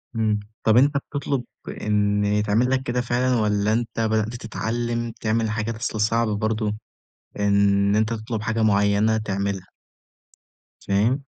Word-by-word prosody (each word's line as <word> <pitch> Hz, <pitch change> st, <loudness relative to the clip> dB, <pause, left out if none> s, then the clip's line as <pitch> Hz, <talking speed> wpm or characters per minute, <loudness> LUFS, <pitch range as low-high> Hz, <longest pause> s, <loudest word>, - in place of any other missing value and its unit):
إمم، 110 Hz, -2 st, +1 dB, 0.2 s
طَب 110 Hz, +1 st, +4 dB
أنت 140 Hz, +3 st, +4 dB
بتطلُب 140 Hz, -2 st, -3 dB, 0.4 s
إن 105 Hz, -1 st, +1 dB
يتعمل 105 Hz, +4 st, +2 dB
لك 130 Hz, 0 st, +1 dB
كده 125 Hz, 0 st, -1 dB
فعلًا 125 Hz, +1 st, +1 dB
والّا 105 Hz, -1 st, +1 dB
أنت 115 Hz, 0 st, -2 dB
بدأت 110 Hz, +1 st, 0 dB
تتعلِّم 115 Hz, +1 st, -3 dB
تعمل 110 Hz, 0 st, 0 dB
حاجات؟ 110 Hz, +1 st, -2 dB
أصل 110 Hz, -1 st, -3 dB
صعبة 110 Hz, 0 st, +1 dB
برضه 110 Hz, 0 st, -1 dB, 0.7 s
إن 100 Hz, 0 st, +3 dB
أنت 110 Hz, +1 st, +1 dB
تطلُب 110 Hz, 0 st, -4 dB
حاجة 110 Hz, +1 st, -1 dB
معيّنة 100 Hz, +1 st, +3 dB
تعملها. 100 Hz, -3 st, -2 dB, 1.1 s
فاهم؟ 110 Hz, +8 st, +1 dB
110 Hz, 130 wpm, -23 LUFS, 105-115 Hz, 1.1 s, طَب